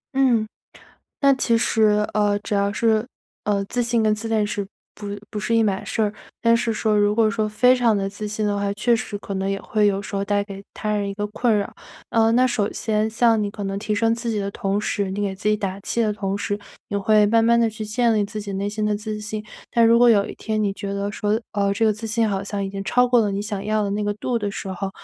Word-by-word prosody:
嗯。 240 -5 +3 0.7
那 275 -1 +5
其 235 -3 +2
实， 210 -2 +2
呃， 205 -1 +2
只 205 0 -3
要 200 0 +1
是， 220 0 +1 0.4
呃， 200 -1 0
自 245 +5 -1
信 235 0 +1
跟 215 -1 +3
自 225 +2 -5
恋 215 -2 +2
是 205 -1 -3 0.3
不 205 - -8 0.2
不 210 - -4
是 205 +3 -1
一 230 - +4
码 195 -2 0
事 225 - -2
儿。 210 -1 +1 0.3
但 230 0 +4
是 230 0 0
说 215 -1 +1
如 205 0 +3
果 225 -1 +4
说， 215 -1 -1
非 250 +4 +4
常 235 -4 +2
地 195 0 -1
自 210 +1 -6
信 215 0 -2
的 205 - 0
话， 200 0 -1
确 235 +3 +2
实 210 -2 -4
可 200 0 -7
能 190 0 -1
也 195 0 -1
会 210 -1 +1
有 195 -1 +1
时 200 - -6
候 195 - 0
带 205 0 +1
给 200 -1 -9
他 215 - -3
人 200 -1 -1
一 - - -4
个 205 0 -2
困 215 +1 +1
扰。 200 - -3 0.4
呃， 225 0 +4
那 255 +2 +4
首 210 -4 0
先 220 0 0
像 225 -1 +3
你 205 - -2
可 205 -1 -6
能 195 0 -3
提 215 0 -2
升 225 +2 +2
自 235 0 -4
己 215 -2 -1
的 200 0 -2
同 200 0 -1
时， 200 -2 -1
你 200 - -4
给 195 -1 -2
自 210 +2 -1
己 210 - +2
打 195 -2 -3
气 235 - -1
的 215 -2 +1
同 200 -1 -2
时， 205 0 -2 0.3
也 205 - -2
会 210 +1 +4
慢 225 +2 +3
慢 235 +1 +4
地 230 - +3
去 215 0 -7
建 230 +2 +1
立 210 - +2
自 215 +1 -5
己 205 -1 -6
内 200 +1 -2
心 210 0 -2
的 210 -1 +1
自 215 0 -5
信。 210 0 -5 0.3
但 235 -1 +4
如 230 +1 +6
果 245 -1 +7
有 205 -3 +4
一 - - -7
天 215 -1 -2
你 200 - +1
觉 200 0 -5
得 200 +1 -2
说， 210 0 0 0.2
呃， 200 -1 +1
这 225 - -1
个 220 - +5
自 215 +2 -6
信 225 0 +1
好 195 -1 -1
像 200 0 -3
已 195 - -3
经 195 0 -5
超 250 0 +3
过 245 -1 +4
了 205 -2 0
你 195 - -2
想 205 -1 -4
要 215 0 +1
的 200 - -1
那 205 +1 -1
个 205 0 0
度 235 +3 -2
的 205 -2 -2
时 195 - -6
候， 190 +1 -3
210 Hz, 295 characters per minute, -22 LUFS, 200-225 Hz, 0.7 s, 果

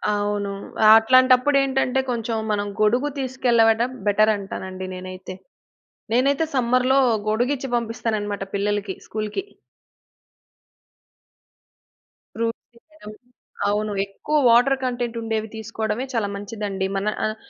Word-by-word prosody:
అవును. 205 0 -1 0.4
ఆహ్, - - +9
అట్లాంటప్పుడేంటంటే 260 +2 +3
కొంచెం 230 -2 -2
మనం 205 -1 0 0.2
గొడుగు 245 +7 +2
తీసుకెళ్ళవడం 240 -2 +2 0.2
బెటర్ 215 +1 +4
అంటానండి 190 -1 -6
నేనైతే. 185 0 -8 0.8
నేనైతే 275 +5 +2
సమ్మర్‌లో 255 +2 +3 0.3
గొడుగిచ్చి 245 +6 +1
ఇచ్చి 240 - -1
పంపిస్తాననమాట 220 -3 -2
పిల్లలకి, 205 -1 -1
స్కూల్‌కి. 215 - -4 2.9
ఫ్రూట్సే 230 +1 -4
ఇయ్యడం. 310 -9 -14 0.6
అవును. 210 +1 -1
ఎక్కువ 200 +10 -2
వాటర్ 245 +4 +5
కంటెంట్ 245 -2 -2
ఉండేవి 220 -1 -2
తీసుకోవడమే 220 +2 -3
చాలా 225 -4 0
మంచిదండి. 200 -1 -4
మన 200 - -2 0.2
ఆహ్, 215 - -2
225 Hz, 100 wpm, -22 LUFS, 205-250 Hz, 2.9 s, ఆహ్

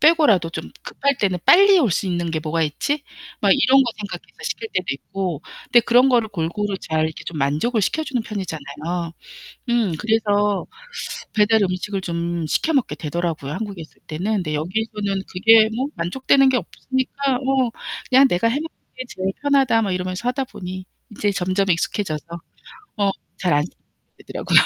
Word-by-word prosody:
빼고라도 300 - +5
좀 160 -1 -6
급할 280 -1 -1
때는 185 -3 +1
'빨리 395 +1 +7
올 235 -9 +2
수 190 - 0
있는 175 -2 -1
게 160 - -1
뭐가 160 +1 -1
있지?' 285 - -1 0.4
막 - - +3
이런 270 -1 +5
거 240 - -1
생각해서 205 -1 -8
시킬 445 - -3
때도 185 - 0
있고 180 +1 -4 0.2
그런데 240 - +6
그런 245 +3 +4
거를 235 -4 +3
골고루 195 +3 -2
잘 155 0 0
이렇게 160 - -7
좀 165 - -6
만족을 155 - +1
시켜 315 +11 0
주는 250 -6 -2
편이잖아요. 165 -3 -5 0.6
음 230 -7 +2
그래서 210 -2 +1 0.7
배달 215 0 +4
음식을 190 +1 -2
좀 170 -2 -2
시켜 315 - 0
먹게 265 -6 +1
되더라고요, 160 -3 -3
한국에 200 -3 -5
있을 - - -19
때는. 160 +4 -4 0.2
그런데 155 -1 -2
여기에서는 200 +4 -2
그게 220 +3 +6
뭐 260 +3 0
만족되는 265 +9 +3
게 255 - +2
없으니까 260 +2 -2
어 265 -1 +1 0.4
그냥 265 +1 +7
'내가 180 +6 +2
해 235 - 0
먹는 310 +3 -2 0.3
게 255 - -4
제일 190 -2 -3
편하다.' 270 -5 +3
뭐 200 - -1
이러면서 185 +5 -3
하다 265 +1 -1
보니 185 -3 -7 0.3
이제 205 -1 +1
점점 195 +1 0
익숙해져서 165 -2 -1 0.7
어 200 -1 +2 0.3
잘 180 -3 +1
안 145 0 +3
시켜 175 - -10 0.4
먹게 - - -17
되더라고요. - - +4
200 Hz, 370 characters per minute, -21 LUFS, 170-245 Hz, 0.7 s, 빨리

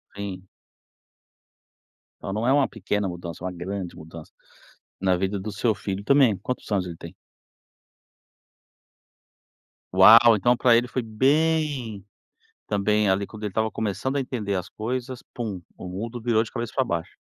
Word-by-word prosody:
Sim. 95 -2 -6 1.8
Então 95 - -4
não 110 +3 -1
é - - +4
uma 140 -1 +3
pequena 105 -1 -2
mudança, 85 -1 -7
uma 95 - -2
grande 90 +1 -5
mudança 80 -1 -11 0.7
na 95 -1 +3
vida 95 +2 -1
do 105 +2 -5
seu 105 +1 0
filho 100 0 -4
também. 135 -3 +4
Quantos 125 +7 -5
anos 95 -3 +1
ele 85 -2 -8
tem? 85 +1 -10 2.8
Uau! 115 +4 +8
Então 120 +4 +3
para 120 -1 +5
ele 120 +1 +2
foi 130 +1 -2
bem 135 - 0 0.6
também, 105 0 +1
ali, 95 +1 +1
quando 110 -1 -12
ele 105 - -2
estava 110 +3 0
começando 110 +6 -2
a 140 - +1
entender 110 -6 -3
as 90 0 -3
coisas, 125 +3 -4
pum, 105 -7 -4 0.2
o 90 - -8
mundo 115 +6 -5
virou 115 -1 +2
de 115 - -7
cabeça 120 -1 -4
para 130 - +2
baixo. 85 -7 -3
105 Hz, 155 wpm, -25 LUFS, 95-120 Hz, 2.8 s, Uau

